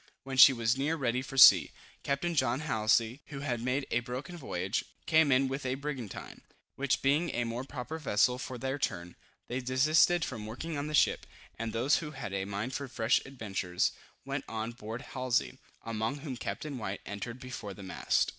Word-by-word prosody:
When 135 0 -5
she 130 +1 +10
was 120 +1 0
near 150 +4 +1
ready 125 -4 0
for 135 +1 -8
sea, 95 - +9 0.3
Captain 140 +5 -1
John 130 -3 +1
Halsey, 115 -2 +1
who 140 -3 -7
had 125 -5 -2
made 130 +3 0
a 120 - +3
broken 125 +8 -6
voyage, 100 - -2 0.2
came 160 -3 +4
in 135 +1 +4
with 135 +2 -4
a 130 0 -1
brigantine, 135 -7 -6 0.3
which 140 -1 0
being 150 +5 +3
a 120 - +1
more 115 +2 -3
proper 140 +3 -6
vessel 125 -2 +2
for 130 0 -5
their 135 +3 -3
turn, 90 -8 -3 0.3
they 125 - -2
desisted 150 +6 +3
from 110 -5 -6
working 155 +9 -5
on 145 +1 -3
the 150 - -1
ship, - - +3 0.3
and 115 -1 -2
those 125 +6 +2
who 155 - -4
had 135 -9 -6
a 95 -1 -1
mind 100 +6 -4
for 140 +1 -3
fresh 115 -1 +2
adventures, 100 -9 -1 0.3
went - - -3
on 110 +1 -3
board 115 +1 -7
Halsey, 130 -3 -1 0.2
among 115 +3 -2
whom 135 -4 -5
Captain 140 +3 -5
White 100 -2 -4
entered 105 +5 -6
before 120 -6 -7
the 100 - -10
mast. 95 - +1
130 Hz, 190 wpm, -31 LUFS, 110-140 Hz, 0.3 s, she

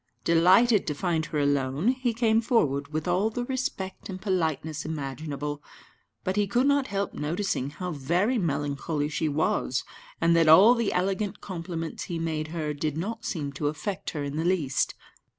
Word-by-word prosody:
Delighted 190 +7 +5
to 150 - -1
find 160 -1 -1
her 155 - -3
alone, 145 - +1
he 255 -1 +1
came 225 -1 +2
forward 145 - +1
with 155 +2 -4
all 185 +5 +2
the 245 +2 -3
respect 245 -9 -4
and 185 -1 -5
politeness 160 -6 -1
imaginable. 145 -1 -4 0.6
But 185 +2 -1
he 205 -1 +2
could 245 +6 +2
not 280 -1 +3
help 200 0 -2
noticing 155 -2 -2
how 180 +5 -5
very 175 - +1
melancholy 145 -2 -1
she 155 0 -1
was, 145 -3 0 0.4
and 170 0 +4
that 165 -2 +4
all 195 +9 +9
the 235 -4 0
elegant 195 +2 -1
compliments 165 -3 -5
he 170 - -4
made 160 -2 -2
her 155 -2 -3
did 150 +1 -2
not 205 +8 -4
seem 145 -5 -3
to 145 +1 -2
affect 155 +6 -3
her 150 -3 -4
in 140 +1 -4
the 160 - 0
least. 165 -7 +1
165 Hz, 170 wpm, -27 LUFS, 150-200 Hz, 0.6 s, all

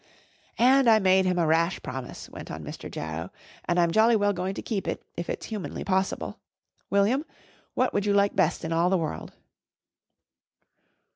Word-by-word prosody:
"And 260 +1 +5
I 220 - +7
made 190 -2 +4
him 180 -1 +1
a 170 - +2
rash 165 +3 +2
promise," 130 -1 -7
went - - -10
on - - -6
Mr. - - -8
Jarrow, 80 +3 -5 0.4
"and 175 0 +1
I'm 170 -1 +3
jolly 225 +4 +5
well 205 -1 +2
going 185 +1 -3
to - - -5
keep 205 -5 -3
it - - -3
if 170 - -5
it's - - -4
humanly 215 -4 -5
possible. 190 0 -1 0.5
William, 210 +8 +2 0.5
what 255 - +1
would 205 0 0
you 205 - +3
like 200 0 +3
best 180 -4 +1
in 165 - -2
all 170 +2 +2
the 190 - +3
world?" 160 -3 -4
190 Hz, 180 wpm, -26 LUFS, 170-210 Hz, 0.5 s, I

